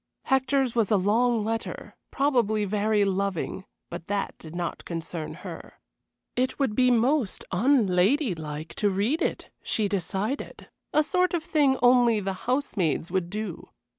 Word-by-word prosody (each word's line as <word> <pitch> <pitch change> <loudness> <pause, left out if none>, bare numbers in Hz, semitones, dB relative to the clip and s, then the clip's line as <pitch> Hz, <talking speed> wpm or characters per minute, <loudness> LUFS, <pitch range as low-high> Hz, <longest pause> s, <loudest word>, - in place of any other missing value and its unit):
Hector's 265 -1 +1
was 225 -4 +1
a 210 - +4
long 220 +3 +2
letter; 225 +1 -4
probably 235 -7 +1
very 210 +1 +1
loving, 195 -1 -2 0.3
but 170 0 -7
that 200 0 -2
did 160 +1 -10
not 175 -1 -4
concern 165 -1 -5
her. - - -9 0.6
It 255 +1 0
would 270 -7 0
be 255 +3 +4
most 245 -1 +1
unladylike 185 - +1
to 205 - +2
read 205 +11 0
it, - - -2
she 215 -2 0
decided 200 - -3 0.2
a 305 - +3
sort 360 +3 +1
of 330 - -2
thing 285 -5 +2
only 245 -3 +5
the 195 -1 -2 0.2
housemaids 190 - 0
would 185 -2 -1
do. 210 -3 -5
215 Hz, 140 wpm, -26 LUFS, 190-255 Hz, 0.6 s, only